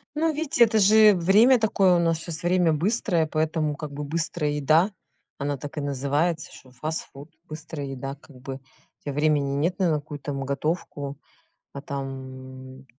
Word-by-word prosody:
Ну, 320 0 +1
видите, 300 -4 +2
это 220 -1 +1
же 210 +1 +7
время 215 +9 +5
такое. 195 -4 +3
У - - +3
нас 165 -1 +1
щас 170 -1 -6
время 175 -2 +3
быстрое, 175 -1 +1
поэтому 155 -1 0
как 150 -1 -7
бы 145 +1 -5
быстрая 155 0 -1
еда, 155 +7 +3 0.5
она 140 0 -2
так 145 +3 -9
и - - -1
называется, 145 +4 -1
что 130 - -15
фастфуд, 150 +1 -6 0.2
быстрая 155 -2 -7
еда, 135 +1 -5
как 145 -2 -18
бы. 135 0 -6
У 135 0 -21
тебя 145 - -4
времени 145 -2 +1
нет 170 +6 0
на 180 -3 +3
какую 145 -1 -4
там 140 -1 -4
готовку, 140 -1 -3 0.6
а 140 - -7
там 130 -1 -8
150 Hz, 165 wpm, -25 LUFS, 140-175 Hz, 0.6 s, же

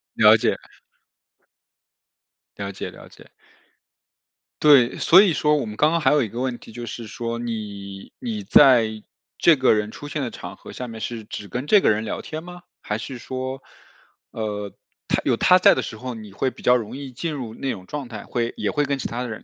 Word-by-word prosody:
了 - - +7
解。 - - 0 2.0
了 - - -4
解， - - -6
了 - - -13
解。 - - -17 1.3
对， 140 -6 +6
所 180 +3 +7
以 195 -5 +3
说 150 0 +2
我 140 - -2
们 105 -1 -7
刚 150 +7 +3
刚 170 - +1
还 155 - +3
有 150 -2 +3
一 110 - -4
个 115 - -6
问 130 -1 -2
题， - - -14
就 120 +1 -7
是 115 0 -7
说 115 +1 -4
你 100 -4 -6
你 225 -5 -4
在 115 - +5 0.3
这 170 - +6
个 130 -3 +4
人 105 0 -1
出 145 - -9
现 145 0 -3
的 125 -4 -3
场 90 +1 -8
合 - - -12
下 125 - -6
面 115 -1 -8
是 115 0 -5
只 105 -1 -7
跟 125 +4 -4
这 210 +2 +6
个 - - +3
人 110 +1 +1
聊 - - -4
天 155 0 -6
吗？ 180 0 -10 0.2
还 105 - -3
是 125 +4 -7
说， 130 +2 -5 0.7
呃， 105 -2 -4 0.4
他 - - +1
有 - - +3
他 185 +9 +5
在 - - +6
的 130 - 0
时 110 - -7
候， 125 +1 -6
你 110 -2 -10
会 130 +6 -1
比 - - -15
较 125 - +5
容 110 -1 -6
易 140 -1 -7
进 155 +6 -4
入 125 -6 -6
那 135 +3 -3
种 95 - -7
状 145 +4 -5
态， 110 -3 -8
会 120 -1 -2
也 - - -2
会 145 -1 +1
跟 140 0 -1
其 135 - -3
他 120 +2 -4
的 125 - -3
人 110 - -7
120 Hz, 235 characters per minute, -23 LUFS, 110-145 Hz, 2.0 s, 了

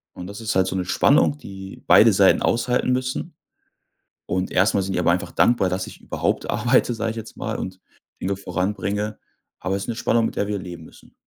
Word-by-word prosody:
und 90 - -7
das 100 +3 -8
ist 110 -1 -2
halt 95 0 +3
so 95 - -3
'ne 90 -1 -1
Spannung, 145 +8 +3
die 95 -7 -10
beide - - +7
Seiten - - +4
aushalten 125 +2 +1
müssen, 130 0 -2 0.9
und 90 +1 -1
erstmal 95 +1 +2
sind 95 0 -3
die - - 0
aber 85 - +3
einfach 90 +3 -2
dankbar, 120 -6 +3
dass 95 +1 -2
ich - - -12
überhaupt - - -2
arbeite, 120 0 +2
sage 115 0 -2
ich 115 - -6
jetzt 115 0 -8
mal, - - -3
und 95 0 -6 0.4
Dinge 100 +1 -1
voranbringe, 100 +3 -2 0.4
aber 95 +1 -2
es 100 - -4
ist - - -7
'ne 115 - -3
Spannung, 115 -1 +2
mit - - -5
der 100 - 0
wir 105 -1 -2
leben 85 -3 -8
müssen. - - -17
100 Hz, 215 wpm, -23 LUFS, 95-115 Hz, 0.9 s, beide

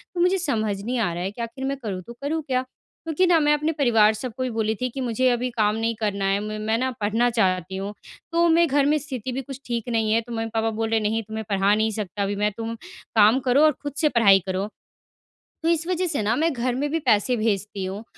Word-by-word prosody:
तो 345 - 0
मुझे 365 +2 +3
समझ 220 - -1
नहीं 245 +2 -2
आ 185 -6 0
रहा 175 +1 -4
है 195 - -2
कि 235 - -8
आखिर 250 +3 -5
मैं 275 0 -2
करूँ 195 -4 -3
तो 235 - -8
करूँ 315 +3 -1
क्या? 255 -1 0 0.4
क्योंकि 325 +3 +2
ना 340 -2 +5
मैं 295 -1 +3
अपने 305 +2 0
परिवार 225 -7 +4
सब 230 +2 -6
को 255 - -1
भी 255 - -1
बोली 220 -1 0
थी 255 - 0
कि 265 +3 -6
मुझे 255 +1 +1
अभी 250 +1 0
काम 215 -3 +1
नहीं 225 +1 0
करना 200 -2 -1
है 195 +1 +2
म 215 0 -5
मैं 220 +1 0
ना 260 +2 0
पढ़ना 225 +4 +2
चाहती 190 -5 0
हूँ। 200 +2 -4 0.4
तो 340 0 +3
मे 335 +1 +5
घर 280 -1 +2
में 300 +2 +3
स्थिति 260 -3 -5
भी 265 - -3
कुछ 270 0 -9
ठीक 235 -1 -3
नहीं 225 -2 +1
है 225 - +4
तो 240 +1 -12
मम्मी-पापा 225 0 -1
बोल 225 0 -2
रहे 225 - +2
हैं - - -5
नहीं 225 +1 -1
तुम्हें 220 +1 -6
पढ़ा 195 +1 +3
नहीं 220 +1 +1
सकता 205 -2 -3
अभी 200 +1 -1
मैं 210 +1 +1
तुम 230 0 -4 0.4
काम 220 +4 +6
करो 255 +3 +4
और 305 - +6
खुद 290 -2 -5
से 305 - +4
पढ़ाई 200 -6 +5
करो। 190 +2 -1 1.0
तो 330 - +2
इस 335 0 +1
वज़ह 365 0 0
से 290 -9 -1
ना 215 +3 +1
मैं 320 +4 +1
घर 245 0 -1
में 285 +3 -1
भी 325 - 0
पैसे 245 -2 +2
भेजती 205 -2 -1
हूँ 195 +3 -5
230 Hz, 260 wpm, -24 LUFS, 210-270 Hz, 1.0 s, काम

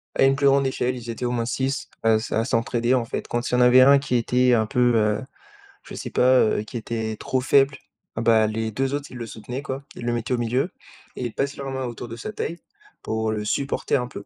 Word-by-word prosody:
À - - +3
une 135 0 +5
plus 140 0 +2
grande 140 0 +4
échelle, 130 -1 -1
ils 120 -1 -9
étaient 120 +2 -5
au 120 - 0
moins 120 -1 -1
6 135 +3 -2
à 115 0 +4
s 110 - -3
à 110 - +1
s'entraider, 120 +1 +1
en 120 -2 0
fait, - - -5
quand 120 +1 -2
il - - -5
y - - +4
en - - +3
avait 125 +1 +7
un 140 +1 +7
qui 130 -3 -2
était 125 +1 +3
un 110 -2 +3
peu, 120 0 +2
heu, 105 -1 +2 0.6
je - - -10
sais - - -6
pas, 130 0 +4
heu, 110 -1 +1
qui 110 - -12
était 110 -1 -3
trop 130 - -2
faible, 135 +1 +3 0.4
eh - - 0
bah, 110 -1 +4
les 110 +1 -2
2 135 +4 -1
autres, 145 0 -3
ils - - -11
le 115 - -5
soutenaient, 120 +5 -7
quoi. 135 0 -5
IIs - - -9
le 120 - 0
mettaient 120 +2 -2
au - - +1
milieu 125 +9 0 0.4
et 125 - -4
ils 120 - -4
passent 140 +1 -2
leur 135 -1 -6
main 130 -1 -3
autour 120 0 -7
de 115 - -7
sa 215 - -6
taille, 170 -3 -4 0.5
pour 110 0 -1
le 105 -1 -3
supporter 140 +6 -1
un 125 -2 0
peu 100 - -9
125 Hz, 265 wpm, -23 LUFS, 115-135 Hz, 0.6 s, avait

